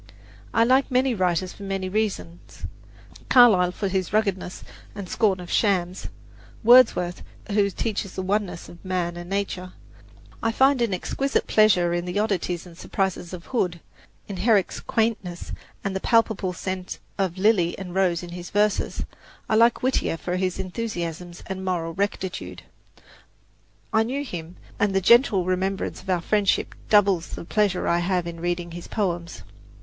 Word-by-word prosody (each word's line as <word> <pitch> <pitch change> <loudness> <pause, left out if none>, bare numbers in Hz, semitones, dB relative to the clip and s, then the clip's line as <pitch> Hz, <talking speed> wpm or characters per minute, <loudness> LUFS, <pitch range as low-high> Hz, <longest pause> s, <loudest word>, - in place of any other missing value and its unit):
I 230 - +4
like 260 +3 +3
many 255 0 +2
writers 185 -2 0
for - - -15
many 195 -1 -3
reasons 195 -4 -3 0.6
Carlyle 210 -8 +6
for 200 +2 -3
his 190 -2 -1
ruggedness 200 -4 -1 0.3
and 200 -2 -6
scorn 195 -1 +1
of 175 -1 -8
shams; 185 -3 +1 0.6
Wordsworth, 225 -7 +5 0.3
who 200 -1 +3
teaches 200 -1 -3
the 190 - -3
oneness 195 -2 -2
of 170 - -14
man 180 -2 -2
and 175 0 -8
nature; 190 -2 -3 0.7
I 225 0 0
find 265 +1 +4
an 235 -3 +1
exquisite 270 +9 -1
pleasure 185 -5 +4
in 175 0 -1
the 180 +2 -3
oddities 185 -5 -1
and 175 -2 -13
surprises 190 -1 -2
of 180 -2 -8
Hood, 180 -9 -1 0.5
in 200 - -6
Herrick's 210 -4 +2
quaintness 215 -6 -2 0.3
and 195 -1 -2
the - - 0
palpable 220 -4 +2
scent 185 0 -5 0.2
of 190 -2 0
lily 190 -4 +2
and 185 -2 -7
rose 180 -3 +1
in 175 - -8
his 175 0 -7
verses; 210 0 0 0.4
I - - -1
like 230 +3 +4
Whittier 255 -9 +1
for 180 +2 -3
his 185 -1 -1
enthusiasms 180 -4 -5
and 190 0 -5
moral 170 -3 -2
rectitude. 190 -1 -3 1.3
I 220 - +5
knew 260 +6 -2
him, 175 - -7 0.2
and 205 -1 +1
the - - +5
gentle 210 -2 +5
remembrance 190 +1 -1
of 190 - -12
our 180 -2 +1
friendship 205 +2 +1 0.2
doubles 200 -5 +4
the - - -7
pleasure 200 -1 +1
I 170 - +3
have 180 0 0
in 170 -1 -6
reading 175 0 -2
his 170 +1 -8
poems. 175 -5 -3
190 Hz, 155 wpm, -24 LUFS, 175-210 Hz, 1.3 s, Carlyle